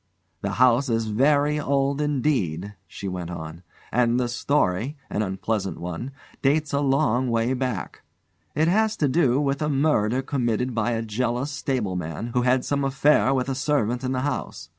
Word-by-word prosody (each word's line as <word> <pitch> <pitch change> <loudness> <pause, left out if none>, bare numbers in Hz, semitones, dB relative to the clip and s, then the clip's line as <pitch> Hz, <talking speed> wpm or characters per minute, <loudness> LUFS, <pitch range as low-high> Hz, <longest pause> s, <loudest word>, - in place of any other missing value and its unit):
"The 100 0 -2
house 125 +3 +4
is 115 -1 +1
very 145 +7 +2
old 140 0 0
indeed," 125 - 0
she 100 - -7
went 90 -2 -4
on, 80 -1 -7 0.3
"and 120 0 +2
the 125 - +1
story 120 0 0
an 105 - 0
unpleasant 95 0 -2
one 90 +8 -5 0.3
dates 145 +2 +1
a 140 - +2
long 135 -3 +2
way 115 +2 +1
back. 125 -7 -3 0.5
It 155 +1 +2
has 220 +4 +2
to 150 - +2
do 135 -2 +3
with 140 0 0
a 150 - 0
murder 135 -4 +1
committed 125 -2 -1
by 115 +1 0
a 115 0 -1
jealous 120 +5 -2
stableman 105 - -3
who 125 - +2
had 125 +1 +2
some 140 -1 0
affair 135 -3 +3
with 130 -1 0
a 135 - -1
servant 130 -3 0
in 130 - -1
the 130 -1 -1
house. 140 -3 -4
125 Hz, 170 wpm, -24 LUFS, 110-140 Hz, 0.5 s, house